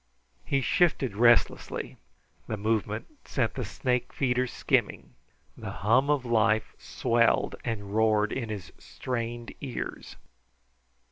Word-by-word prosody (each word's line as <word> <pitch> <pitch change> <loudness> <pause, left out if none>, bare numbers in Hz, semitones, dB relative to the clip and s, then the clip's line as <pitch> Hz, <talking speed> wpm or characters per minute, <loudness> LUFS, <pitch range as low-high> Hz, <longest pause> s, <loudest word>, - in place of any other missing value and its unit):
He 135 -1 0
shifted 135 - +2
restlessly; 120 +1 +2 0.5
the 110 - -3
movement 110 0 -1 0.2
sent 120 -5 -1
the 125 - -3
snake 125 +4 -1
feeders 125 -2 0
skimming. 60 0 0 0.4
The - - -7
hum 125 +8 +2
of 145 -4 +1
life 110 -2 +2
swelled 115 0 +1
and 100 -4 -4
roared 110 -1 +3
in 120 -4 -3
his 105 -4 -6
strained 120 -1 -5
ears. 130 -4 -6
115 Hz, 115 wpm, -28 LUFS, 110-125 Hz, 0.5 s, roared